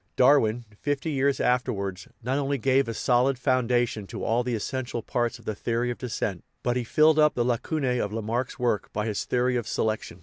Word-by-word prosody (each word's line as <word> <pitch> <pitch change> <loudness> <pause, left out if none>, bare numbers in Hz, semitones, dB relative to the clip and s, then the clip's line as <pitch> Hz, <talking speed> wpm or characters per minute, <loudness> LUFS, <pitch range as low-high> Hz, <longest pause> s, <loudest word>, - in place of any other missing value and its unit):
Darwin, 120 -3 +4
fifty 145 +2 -1
years 140 -1 +1
afterwards, 100 -7 -1 0.2
not 130 +4 0
only 140 0 0
gave 135 +1 +2
a 115 - -3
solid 125 +3 +2
founda 125 -2 +2
tion 105 -3 -7
to - - -6
all 115 +2 +2
the 120 -1 -1
essential 120 +1 -3
parts 120 +1 -1
of 115 - -19
the 110 - -2
theory 120 +3 -1
of 120 - -7
descent, 110 -6 -3 0.2
but 120 0 +1
he 125 - 0
filled 155 +6 +4
up 150 0 +4
the 120 - +1
lacunae 125 +1 0
of 105 - -1
Lamarck's 115 +3 -2
work 120 -6 -1
by 105 0 -1
his 105 -3 -2
theory 125 0 +1
of 120 - -3
selection. 110 0 -2
125 Hz, 205 wpm, -26 LUFS, 115-130 Hz, 0.2 s, Darwin